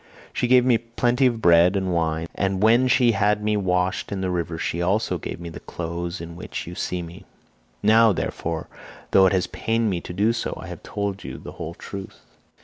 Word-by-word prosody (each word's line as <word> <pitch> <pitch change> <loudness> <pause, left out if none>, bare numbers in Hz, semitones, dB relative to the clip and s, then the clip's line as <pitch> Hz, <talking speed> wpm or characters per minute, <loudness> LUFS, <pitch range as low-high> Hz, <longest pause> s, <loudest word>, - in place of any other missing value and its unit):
She 125 - 0
gave 125 0 +5
me 120 -3 +4
plenty 120 +2 +1
of 115 -2 -2
bread 85 +2 +6
and 95 -2 0
wine, 80 -1 0
and 95 0 -1
when 120 +4 +5
she 125 -1 +4
had 100 -2 -1
had 105 - -10
me 105 0 +1
washed 90 -2 0
in 100 -1 -3
the 95 -1 -1
river 85 -2 -2
she 85 +1 -2
also 100 +5 0
gave - - -6
me 85 -1 -7
the 80 - -9
clothes 85 +1 -5
in 85 0 -8
which 85 - -6
you 85 - -7
see 90 0 -3
me. 85 +1 -10 0.6
Now, 110 +1 +6
therefore, 85 -3 -3 0.4
though 95 -1 +6
it - - +2
has 95 -2 +2
pained 115 -1 -1
me 90 -2 -2
to - - -8
do 105 +6 +2
so, 115 - -3
I - - -8
have - - -8
told 100 -2 -4
you - - -7
the - - -9
whole 85 +1 -7
truth." 100 0 -9
95 Hz, 220 wpm, -23 LUFS, 85-110 Hz, 0.6 s, bread